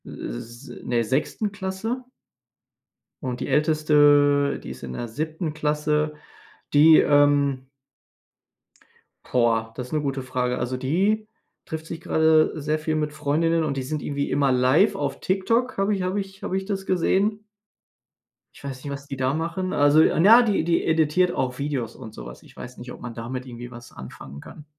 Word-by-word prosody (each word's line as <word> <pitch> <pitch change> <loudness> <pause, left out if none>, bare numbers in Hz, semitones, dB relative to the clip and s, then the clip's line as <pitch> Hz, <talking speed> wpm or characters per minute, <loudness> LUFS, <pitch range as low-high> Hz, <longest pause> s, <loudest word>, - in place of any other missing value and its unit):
Äh, - - -10 0.3
s 120 - -12
in - - -10
der 120 -1 +2
6. 150 - -1
Klasse. 205 +6 -4 1.2
Und 125 -3 -4
die 130 - -4
älteste, 145 -1 +3
die - - -7
ist - - -10
in 65 -1 -6
der 120 - -5
7. 155 +6 -4
Klasse, 150 0 0 0.6
die 155 +2 +7
ähm 145 -2 +3 1.6
Boah, 115 -2 +1
das 125 -1 -6
'ne 155 - 0
gute 135 -2 -3
Frage. 125 -1 -2
Also 125 +1 -2
die 195 +11 0 0.4
trifft 160 -2 -6
sich 165 0 -7
gerade 160 -1 +3
sehr 155 +1 -1
viel 155 0 -2
mit 150 -1 -2
Freundinnen 160 +3 +1
und 140 -3 -2
die 130 - -2
sind 150 +3 -4
irgendwie 140 0 -3
immer 140 -1 +2
live 130 +11 +3
auf 140 -2 -3
TikTok. 230 +7 0
Habe 195 +2 +1
ich 190 - -3
habe 185 +2 -1
ich 195 0 -8
habe 190 - -1
ich 190 - -4
das 195 -1 -3
gesehen. 195 +4 +1 1.1
Ich - - -16
weiß 130 -2 -7
nicht, 145 - -5
was 140 0 -7
die 140 - -5
da 130 0 0
machen. 170 +4 -3
Also 145 +2 +5
'n 160 +2 +3
ja, 230 +4 +9
die 210 -8 +1
die 170 0 +1
editiert 160 +2 +2
auch 130 -1 -2
Videos 140 -5 -3
und 110 -4 -10
so 60 - -9
was. - - -11
Ich - - -18
weiß 125 +1 -9
nicht, 125 +1 -9
ob - - -10
man 125 -1 -7
damit 125 +3 -6
irgendwie 120 -1 -9
was 120 0 -12
anfangen 65 +2 -10
kann. 150 - -12
150 Hz, 180 wpm, -24 LUFS, 130-165 Hz, 1.6 s, ja